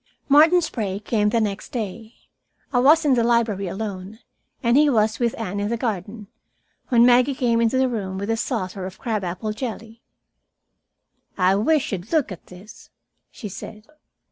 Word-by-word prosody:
Martin 315 +5 +6
Sprague 215 - -4
came 210 -2 +1
the 230 - +1
next 210 -2 -3
day. 225 0 -6 0.6
I 245 - +3
was 305 +5 +5
in 285 - +4
the 240 -2 +2
library 230 -5 +1
alone, 195 +1 -6 0.5
and 235 0 +3
he 295 +1 +5
was 220 -3 +1
with 235 -2 0
Anne 200 -2 -4
in 205 +1 -2
the 235 - -1
garden, 210 -1 -4 0.6
when 235 -2 +5
Maggie 250 +3 +4
came 235 -2 +1
into 230 +3 +2
the 260 0 +3
room 195 -6 -4
with 200 +3 -3
a - - +1
saucer 190 -6 -3
of 190 - -11
crab 220 -5 -3
apple 185 +5 -4
jelly. 225 -1 -7 1.4
"I 185 0 +3
wish 290 +9 +1
you'd 190 0 -5
look 310 -9 +1
at 185 - -10
this," 185 +4 -14 0.4
she 220 - -8
said. 210 +2 -10
220 Hz, 170 wpm, -22 LUFS, 200-245 Hz, 1.4 s, Martin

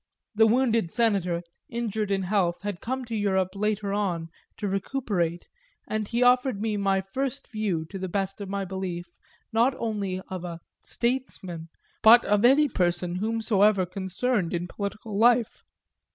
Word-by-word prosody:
The 220 +1 +5
wounded 230 -6 +2
Senator, 190 -7 +1 0.3
injured 220 -3 -2
in 195 -1 0
health, 180 -2 0
had 205 -4 -4
come 260 +2 -3
to 230 -1 -4
Europe 190 -3 +1
later 205 0 -1
on 175 -5 -1 0.3
to 205 - -3
recuperate, 195 -4 -1 0.4
and 215 -1 -2
he 235 +3 +1
offered 250 -3 +3
me 215 0 -1
my 195 -1 +1
first 265 +8 -4
view, 205 -8 -1
to 195 - -5
the 185 0 -4
best 195 +2 -2
of 200 - -5
my 200 0 -2
belief, 185 -2 -4 0.5
not 240 +4 +3
only 205 -5 -2
of 185 -2 -6
a 170 -2 -6 0.2
"statesman," 205 -10 -3 0.3
but 235 +2 +8
of 205 +1 +2
any 275 +5 +6
person 175 -4 0
whomsoever 215 -2 +2
concerned 190 +1 -1
in 175 +1 -3
political 200 +2 -5
life. 240 0 +3
200 Hz, 150 wpm, -26 LUFS, 185-225 Hz, 0.5 s, but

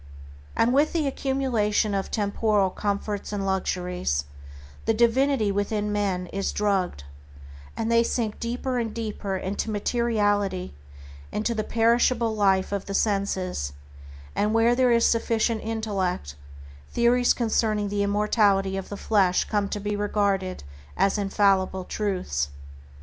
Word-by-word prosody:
And 235 +2 +3
with 290 +3 +3
the 325 -3 +1
accumulation 250 -7 0
of 195 -1 -2
temporal 205 -2 +1
comforts 205 0 -3
and 200 -2 -2
luxuries, 180 - -1 0.6
the 225 - +2
divinity 235 -1 +3
within 205 +1 -1
men 195 -3 -1
is 195 0 -1
drugged, 195 - 0 0.7
and 225 +1 -1
they 230 0 +5
sink 230 -2 -1
deeper 245 +2 -2
and 225 -2 -3
deeper 210 -4 -3
into 195 +4 -3
materiality, 205 - 0 0.6
into 215 +3 -1
the 215 -1 -2
perishable 230 0 +2
life 195 -2 +2
of 200 -1 -2
the 195 - -4
senses, 190 - -1 0.6
and 210 +2 +1
where 230 +1 +4
there 250 0 +3
is 235 0 +4
sufficient 230 -1 +1
intellect, 195 - -2 0.5
theories 240 +1 +3
concerning 215 -3 0
the 205 0 -1
immortality 200 -1 +2
of 195 - -6
the 205 - -5
flesh 195 -5 +2
come 205 -2 -1
to 205 - -3
be 205 +1 -2
regarded 200 - -1 0.3
as 200 +2 +2
infallible 195 -2 +2
truths. 180 - -2
205 Hz, 130 wpm, -25 LUFS, 195-230 Hz, 0.7 s, they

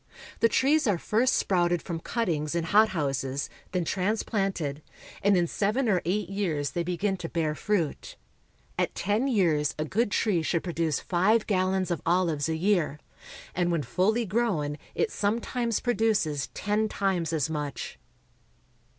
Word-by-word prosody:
The 230 - +4
trees 285 +4 +3
are 200 -4 +2
first 230 +8 +2
sprouted 175 -2 +2
from 170 -3 -4
cuttings 165 -7 -1
in 170 - 0
hot 215 +6 +5
houses, 140 -4 -2 0.2
then 180 -2 -1
transplanted, 190 - -1 0.4
and 200 -1 +4
in 175 - +3
seven 215 +9 0
or 185 -5 +2
eight 195 +2 0
years 170 -8 -1
they 175 - -1
begin 180 +3 -1
to 165 -2 -6
bear 160 -3 0
fruit. 165 0 -2 0.6
At - - 0
ten 210 +8 0
years 165 - +2
a 155 - -1
good 215 +8 0
tree 195 -4 +1
should 165 +1 0
produce 165 -4 -1
five 205 +5 +2
gallons 185 -2 +1
of 170 - -1
olives 165 -4 +1
a 160 - 0
year; 170 -4 +1 0.5
and 175 -1 +1
when 165 -3 0
fully 215 +9 +1
grown 185 -9 0 0.2
it 455 - 0
sometimes 230 +2 -1
produces 215 - +1
ten 210 +1 0
times 185 -6 0
as 155 -5 +1
much. 150 -2 -5
185 Hz, 150 wpm, -27 LUFS, 160-210 Hz, 0.6 s, hot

